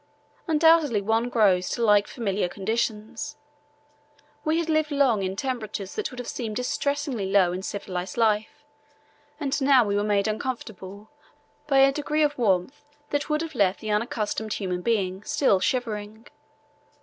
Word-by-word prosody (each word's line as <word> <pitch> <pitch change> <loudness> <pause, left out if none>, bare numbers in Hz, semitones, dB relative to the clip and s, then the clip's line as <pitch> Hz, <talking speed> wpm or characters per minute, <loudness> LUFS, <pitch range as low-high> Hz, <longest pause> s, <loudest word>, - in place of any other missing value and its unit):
Undoubtedly 320 -6 +4
one 225 +4 0
grows 195 -6 +3
to 235 - 0
like 205 -1 +4
familiar 200 -6 -2
conditions. 225 +7 -3 1.1
We 310 +1 +1
had 335 -1 -1
lived 310 -1 +1
long 275 -8 +2
in 190 0 -2
temperatures 215 -5 -4
that 430 - -3
would 255 - -12
have 245 - -6
seemed 225 -4 -4
distressingly 250 -3 -2
low 185 -3 +4
in 185 - -4
civilized 185 -1 -5
life, 220 +6 +1 0.8
and 285 -1 -1
now 265 -3 +5
we 200 -1 -1
were 205 - +1
made 205 -1 +1
uncomfortable 215 -3 -5 0.6
by 275 -2 +2
a 270 0 +6
degree 300 +2 0
of 295 0 +1
warmth 220 +3 0 0.3
that 290 +1 -1
would 305 +1 +1
have 325 -1 -7
left 200 -6 +2
the 215 -1 -4
unaccustomed 215 0 -1
human 180 -3 -3
being 195 -4 0
still 270 -4 +2
shivering. 220 -1 -2
225 Hz, 150 wpm, -25 LUFS, 200-275 Hz, 1.1 s, a